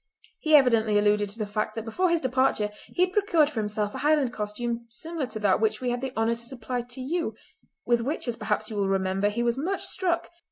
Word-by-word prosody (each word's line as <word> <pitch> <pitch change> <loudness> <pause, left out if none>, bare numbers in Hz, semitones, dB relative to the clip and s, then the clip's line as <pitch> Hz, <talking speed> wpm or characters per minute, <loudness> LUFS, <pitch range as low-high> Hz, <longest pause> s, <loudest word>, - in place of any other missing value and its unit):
He 310 -1 +4
evidently 225 -6 +5
alluded 205 0 +3
to 205 - -3
the 215 - -2
fact 215 +1 -2
that 225 -1 -4
before 360 +11 +1
his 335 -1 +2
departure 260 -5 +1 0.2
he 360 - +1
had 365 0 0
procured 340 -8 +3
for 235 - -3
himself 210 -1 -2
a - - -5
Highland 295 -4 +2
costume 230 +3 -3
similar 320 +3 -4
to 240 - -6
that 200 0 +3
which 220 -1 +1
we 250 -1 -1
had 245 0 -2
the 265 -1 -3
honour 225 +1 +2
to 235 0 -7
supply 245 0 -3
to 245 +2 -10
you, 330 +6 -2 0.5
with 240 -1 +3
which, 275 +3 -3
as 240 - 0
perhaps 215 0 -2
you 210 - -4
will 200 -1 +1
remember, 195 +1 +1
he 235 +3 -1
was 240 +2 0
much 375 +7 -1
struck. 345 -2 -1
235 Hz, 235 wpm, -27 LUFS, 215-280 Hz, 0.5 s, evidently